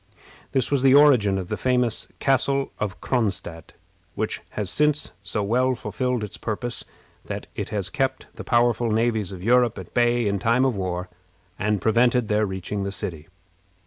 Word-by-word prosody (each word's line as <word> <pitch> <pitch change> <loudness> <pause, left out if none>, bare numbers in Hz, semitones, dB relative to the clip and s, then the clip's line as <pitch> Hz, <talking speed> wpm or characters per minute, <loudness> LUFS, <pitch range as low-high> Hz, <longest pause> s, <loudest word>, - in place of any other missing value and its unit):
This 130 -1 0
was 140 -2 +2
the 135 0 +6
origin 125 -10 +5
of 95 -2 -5
the - - -1
famous 125 -3 0
Castle 135 0 +1
of 105 -2 -3
Cronstadt, 100 - -2 0.4
which - - -2 0.2
has 105 -4 0
since 150 0 +1
so 105 +1 -2
well 125 +5 +2
fulfilled 125 +2 -2
its 105 0 -7
purpose 120 +2 -2 0.4
that - - -5
it - - -4
has 100 -3 -3
kept 130 -1 -1
the - - -8
powerful 120 -1 +2
navies 110 -2 0
of 90 -2 -8
Europe 120 +1 +3
at 95 - -9
bay 120 -1 +2
in 100 -1 0
time 120 +5 +2
of 130 -4 +1
war, 90 -1 -3 0.5
and 105 -1 0
prevented 120 +1 +3
their 105 0 +2
reaching 95 +2 -4
the 100 0 -2
city. 80 -5 -5
115 Hz, 170 wpm, -24 LUFS, 100-125 Hz, 0.5 s, the